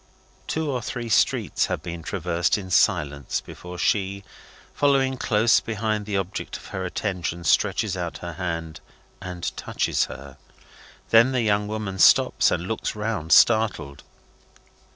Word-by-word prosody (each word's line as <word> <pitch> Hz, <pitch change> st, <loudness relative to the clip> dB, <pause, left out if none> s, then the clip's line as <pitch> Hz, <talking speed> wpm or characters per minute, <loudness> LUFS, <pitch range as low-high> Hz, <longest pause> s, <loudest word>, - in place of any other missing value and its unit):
Two 160 Hz, 0 st, -2 dB
or 125 Hz, -2 st, -2 dB
three 120 Hz, +1 st, -5 dB
streets 110 Hz, -, +2 dB
have -, -, -3 dB
been 85 Hz, -1 st, -6 dB
traversed 85 Hz, 0 st, -1 dB
in 95 Hz, -2 st, -8 dB
silence 70 Hz, -5 st, +1 dB
before 90 Hz, 0 st, -10 dB
she, 100 Hz, +1 st, 0 dB, 0.5 s
following 135 Hz, -2 st, +2 dB
close 115 Hz, -2 st, +3 dB
behind 110 Hz, -1 st, -3 dB
the 100 Hz, -2 st, -1 dB
object 95 Hz, 0 st, -4 dB
of -, -, -15 dB
her 95 Hz, -1 st, -3 dB
attention, 90 Hz, -2 st, -3 dB
stretches 80 Hz, -, +1 dB
out -, -, -4 dB
her 85 Hz, -1 st, -7 dB
hand 85 Hz, -3 st, -4 dB, 0.4 s
and 90 Hz, -2 st, -5 dB
touches -, -, -1 dB
her. 70 Hz, 0 st, -11 dB, 0.7 s
Then 115 Hz, +3 st, +6 dB
the 125 Hz, -2 st, +1 dB
young 105 Hz, -1 st, +1 dB
woman 105 Hz, -3 st, -4 dB
stops -, -, +5 dB
and 90 Hz, -, -2 dB
looks 110 Hz, 0 st, -3 dB
round, 105 Hz, -7 st, -3 dB
startled. 110 Hz, -11 st, +3 dB
100 Hz, 140 wpm, -24 LUFS, 85-110 Hz, 0.7 s, Then